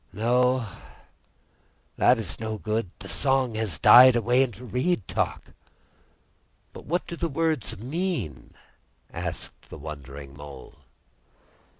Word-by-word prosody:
No, 125 +2 +2 1.3
it 125 - +4
is 110 -6 -6
no 110 -1 -3
good; 110 -1 -2
the 100 - -10
song 135 0 +1
has 110 -8 -2
died 125 - +9
away 120 +2 +3
into 125 -1 -2
reed 125 - -1
talk." - - -3 1.2
"But - - -11
what 175 +3 -1
do 170 - -6
the 170 0 -2
words 155 -3 -1
mean?" 125 - -4 0.6
asked - - -6
the - - -9
wondering 70 -2 -9
Mole. 70 -2 -11
115 Hz, 115 wpm, -26 LUFS, 90-130 Hz, 1.3 s, died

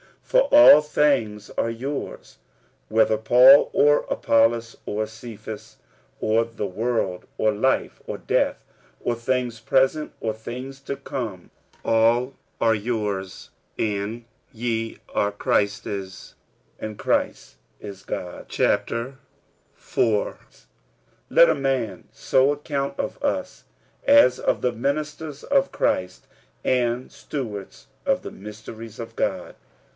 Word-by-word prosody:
For - - +3
all 290 - +10
things 125 -9 0
are 115 - +1
your's; 130 +5 -6 0.5
46:003:022 110 - -9
Whether 110 -1 +4
Paul, 125 +5 +7
or 145 0 +4
Apollos, 115 0 +2
or 110 +1 -2
Cephas, 110 -1 -9 0.5
or 110 +1 +2
the 115 -2 -5
world, 100 -2 -2
or 110 - +2
life, 120 +6 0
or - - -4
death, - - 0 0.4
or 120 - +1
things 120 -1 -2
present, 135 +6 +1
or 110 - 0
things 125 +5 -8
to 140 - -4
come; 120 -9 -6 0.3
all 115 +3 +3 0.3
are 115 -1 +4
your's; 105 -4 -3 0.3
46:003:023 105 -2 0
And 115 +3 -6 0.3
ye 115 -1 -2 0.2
are 100 0 +1
Christ's; 100 -2 -2 0.4
and 110 -1 -6
Christ - - -1 0.2
is 100 -2 -9
God's. 90 -1 -6
46:004:001 135 - -2 0.6
Let - - +7
a - - +4
man 130 -8 -2
so 135 +2 +2
account 140 -1 -3
of - - -4
us, - - -2 0.4
as 285 +1 +6
of - - 0
the 125 - +1
ministers 150 +4 -3
of 275 -1 +1
Christ, 90 0 -1 0.4
and 125 0 0
stewards 110 -9 -7 0.2
of - - +1
the - - -7
mysteries 110 +2 -10
of 115 -1 -8
God. - - -2
115 Hz, 120 wpm, -24 LUFS, 110-135 Hz, 0.6 s, all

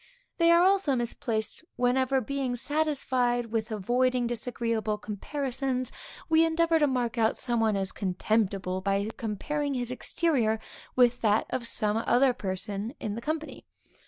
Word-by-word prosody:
They 335 0 +5
are 340 +1 +6
also 380 -7 +3
misplaced, 235 +1 -2
whenever, 260 +2 +2
being 265 0 -2
satisfied 255 -4 0
with 225 0 -1
avoiding 245 +4 +1
disagreeable 230 -2 -2
comparisons, 255 +4 -3 0.4
we 320 0 +5
endeavor 330 0 +2
to 295 - +4
mark 245 -3 -1
out 220 0 +2
some 240 -2 0
one 220 -2 +2
as 195 -1 0
contemptible, 190 -1 -1
by 200 +2 0
comparing 280 +7 -2
his 245 -1 -1
exterior 255 -5 +1 0.4
with 245 -1 +4
that 215 -1 +3
of 240 -2 -2
some 215 -2 0
other 250 +3 +3
person 200 +3 -4
in 210 - -3
the 230 - -5
company. 310 +4 -4
240 Hz, 140 wpm, -28 LUFS, 220-275 Hz, 0.4 s, are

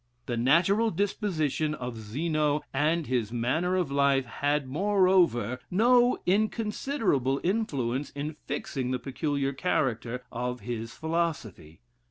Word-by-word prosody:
The 120 - -2
natural 170 - +3
disposition 160 -6 -1
of 125 -4 -5
Zeno, 150 +7 -1
and 155 +4 +1
his 120 -5 -1
manner 130 +10 0
of 180 -6 0
life, 140 -1 +3
had, 145 +2 -1
moreover, 175 - +2
no 245 +5 +4
inconsiderable 210 - 0
influence 145 - -1
in 145 +2 -5
fixing 130 -3 -3
the 130 - 0
peculiar 140 +1 -2
character 125 -5 -1
of 125 +1 -3
his 115 +1 -5
philosophy. 160 - -3
145 Hz, 115 wpm, -28 LUFS, 125-180 Hz, -, no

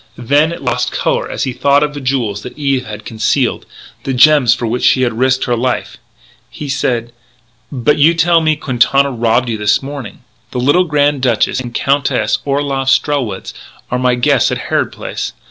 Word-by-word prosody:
Then 145 +7 +2
it 170 - -7
lost - - -1
colour - - -1
as - - -3
he 130 - -2
thought 140 +3 +2
of 150 0 -2
the 145 - -7
jewels 125 -6 -1
that 125 - -10
Eve 135 -4 -1
had 105 0 -8
concealed 110 -1 -1 0.4
the 135 - -2
gems 130 -1 +5
for 120 - -4
which 120 +2 -2
she 130 - +3
had 120 - 0
risked 130 +3 +1
her 120 - 0
life. 125 +1 -2 0.5
He 145 +2 -8
said: 120 -3 -1 0.6
"But 145 +2 +1
you 160 +4 +5
tell 165 0 +3
me 155 -1 +2
Quintana 140 0 +1
robbed 120 0 +1
you 110 -2 -3
this 105 +5 +1
morning." 135 -6 -7
"He - - -22
did. - - -27
The - - -1
little 180 +6 +4
Grand 145 -3 +1
Duchess 125 0 +1
and 125 -2 -6
the - - -3
Countess 135 -7 0
Orloff 140 -1 -1
Strelwitz 130 -9 0 0.4
are 125 - 0
my 125 -1 +2
guests 125 0 +2
at - - -1
Harrod - - +1
Place. - - -6
130 Hz, 195 wpm, -15 LUFS, 120-145 Hz, 0.6 s, gems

